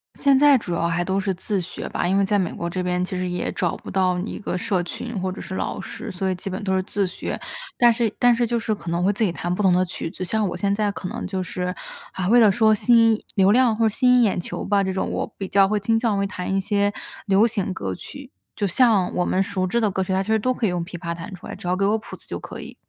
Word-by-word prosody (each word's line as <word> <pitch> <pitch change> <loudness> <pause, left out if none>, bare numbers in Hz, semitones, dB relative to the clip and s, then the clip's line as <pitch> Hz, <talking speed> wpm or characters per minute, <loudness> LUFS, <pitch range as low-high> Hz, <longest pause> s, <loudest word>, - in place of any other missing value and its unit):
现 280 -2 +4
在 285 0 +6
主 180 -7 -4
要 170 0 0
还 170 +1 0
都 190 +2 0
是 195 -1 -1
自 195 +2 -2
学 175 - -6
吧， - - -1
因 190 +2 +2
为 200 - +3
在 205 +1 +2
美 185 -4 0
国 170 - -4
这 185 +2 -3
边 180 0 0
其 185 - -5
实 180 0 -2
也 180 0 -2
找 175 -3 -1
不 - - -11
到 185 -1 +2
你 185 +5 -4
一 - - -6
个 195 - -3
社 185 0 0
群 235 +5 -6
或 185 0 -1
者 185 - -8
是 190 - -6
老 - - -3
师， - - -7
所 190 +1 -2
以 185 - 0
基 185 +2 -6
本 190 0 -4
都 190 -1 0
是 190 - +2
自 200 +1 -1
学。 - - -5 0.4
但 240 -1 +6
是 230 -2 0
但 245 -1 +5
是 240 +1 +1
就 235 0 0
是 220 -1 -1
可 175 - -8
能 170 +1 0
会 200 +2 +3
自 215 - -1
己 200 - +2
弹 175 +1 -3
不 180 - -2
同 190 -2 +4
的 180 +1 +3
曲 175 -2 -5
子， 185 - -6
像 215 +4 0
我 - - -5
现 200 -1 0
在 205 0 0
可 195 -2 -6
能 - - -5
就 190 -1 -3
是， 180 0 -3 0.4
啊， 185 -1 -2
为 240 +5 +6
了 220 -3 +6
说 220 +2 +4
吸 230 +1 +5
引 220 - -3
流 195 0 +5
量 240 -1 +4
或 225 +1 +2
者 - - +4
吸 250 +4 0
引 250 0 +6
眼 200 -5 +1
球 175 - -5
吧 200 -1 +2
这 190 - -1
种， 190 - -2
我 - - -3
比 195 - -4
较 195 0 +4
会 210 +1 0
倾 225 +3 +1
向 225 -3 +1
会 200 - +1
弹 185 -1 -4
一 195 - +2
些 205 +1 +1 0.4
流 195 +2 +5
行 200 -4 -2
歌 95 - -4
曲， 280 - -11 0.2
就 205 - -1
像 205 -2 +3
我 180 - +2
们 185 - +1
熟 190 -1 -1
知 235 +6 0
的 220 -2 +2
歌 190 0 -1
曲， 185 - -4
它 190 +1 +1
其 215 - -3
实 220 - +3
都 255 +4 +1
可 245 - -2
以 - - +2
用 175 -1 -2
琵 175 +1 -8
琶 170 0 -4
弹 170 +4 -8
出 180 - -12
来， - - -6
只 - - -8
要 180 +1 +1
给 195 - +1
我 210 +2 +2
谱 220 - -10
子 - - -21
就 - - -5
可 - - -9
以。 - - -9
195 Hz, 335 characters per minute, -23 LUFS, 180-220 Hz, 0.4 s, 在